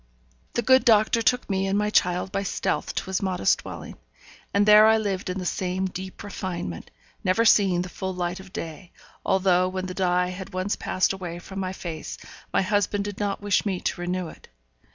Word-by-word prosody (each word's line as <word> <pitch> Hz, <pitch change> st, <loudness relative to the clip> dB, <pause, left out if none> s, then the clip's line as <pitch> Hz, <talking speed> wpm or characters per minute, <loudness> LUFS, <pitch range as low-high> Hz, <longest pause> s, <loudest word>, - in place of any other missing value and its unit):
The 240 Hz, -, +1 dB
good 260 Hz, +3 st, +5 dB
doctor 225 Hz, -1 st, +4 dB
took 250 Hz, +2 st, +2 dB
me 195 Hz, -1 st, 0 dB
and 195 Hz, +1 st, +1 dB
my 210 Hz, 0 st, +1 dB
child 180 Hz, -1 st, +2 dB
by 195 Hz, 0 st, -1 dB
stealth 195 Hz, -, -2 dB
to -, -, -1 dB
his 190 Hz, 0 st, -2 dB
modest 185 Hz, -, +1 dB
dwelling; -, -, -8 dB, 0.5 s
and 200 Hz, 0 st, +3 dB
there 210 Hz, +1 st, +8 dB
I 220 Hz, 0 st, +5 dB
lived 195 Hz, -4 st, -2 dB
in 180 Hz, -, -2 dB
the 185 Hz, -, -4 dB
same 185 Hz, +1 st, -1 dB
deep 185 Hz, 0 st, -6 dB
refinement, 175 Hz, -, -5 dB, 0.3 s
never 190 Hz, +5 st, +2 dB
seeing 190 Hz, -5 st, +4 dB
the -, -, -6 dB
full 190 Hz, +1 st, -4 dB
light 180 Hz, +1 st, -2 dB
of 190 Hz, 0 st, -12 dB
day, 165 Hz, +1 st, -7 dB, 0.3 s
although 185 Hz, -1 st, +3 dB
when 185 Hz, 0 st, -3 dB
the 185 Hz, -, -5 dB
dye 180 Hz, -1 st, +1 dB
had 190 Hz, +1 st, -8 dB
once 185 Hz, +2 st, 0 dB
passed 185 Hz, -, 0 dB
away 180 Hz, -3 st, -6 dB
from 190 Hz, +2 st, -8 dB
my 185 Hz, -1 st, -2 dB
face 170 Hz, -4 st, -6 dB, 0.3 s
my -, -, +2 dB
husband 205 Hz, 0 st, 0 dB
did 205 Hz, -1 st, -6 dB
not 205 Hz, -1 st, -2 dB
wish 205 Hz, -1 st, +2 dB
me 195 Hz, -4 st, -1 dB
to 175 Hz, -, -3 dB
renew 180 Hz, 0 st, -2 dB
it. -, -, -15 dB
190 Hz, 200 wpm, -25 LUFS, 180-205 Hz, 0.5 s, there